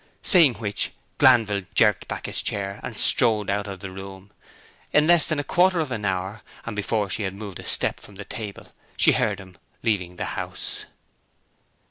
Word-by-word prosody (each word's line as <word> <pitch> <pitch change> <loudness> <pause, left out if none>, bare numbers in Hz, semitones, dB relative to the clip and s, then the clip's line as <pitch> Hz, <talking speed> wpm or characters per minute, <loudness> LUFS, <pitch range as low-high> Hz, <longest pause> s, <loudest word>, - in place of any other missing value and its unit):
Saying 160 -10 +6
which, 105 -3 -3 0.3
Glanville 105 -7 +4
jerked 105 -3 +3
back - - -6
his - - -3
chair, 100 -1 -3
and - - -7
strode 105 -3 +2
out 100 +1 -2
of 95 -2 -8
the 95 -2 -7
room. 95 +1 -11 0.6
In 150 - +4
less 170 -1 +7
than 155 - -1
a 145 - -1
quarter 180 +3 +2
of 155 -5 -2
an 110 -4 -4
hour, 95 +3 -3 0.2
and 115 - -5
before 105 0 -1
she 95 +3 -3
had 95 -1 -3
moved 100 -3 -8
a - - -9
step - - +4
from 100 - -14
the 100 +1 -9
table, 110 -6 -8 0.3
she - - +6
heard 100 -3 0
him 95 -2 -14 0.2
leaving 90 -5 -1
the - - -4
house. - - -5
105 Hz, 185 wpm, -23 LUFS, 95-115 Hz, 0.6 s, less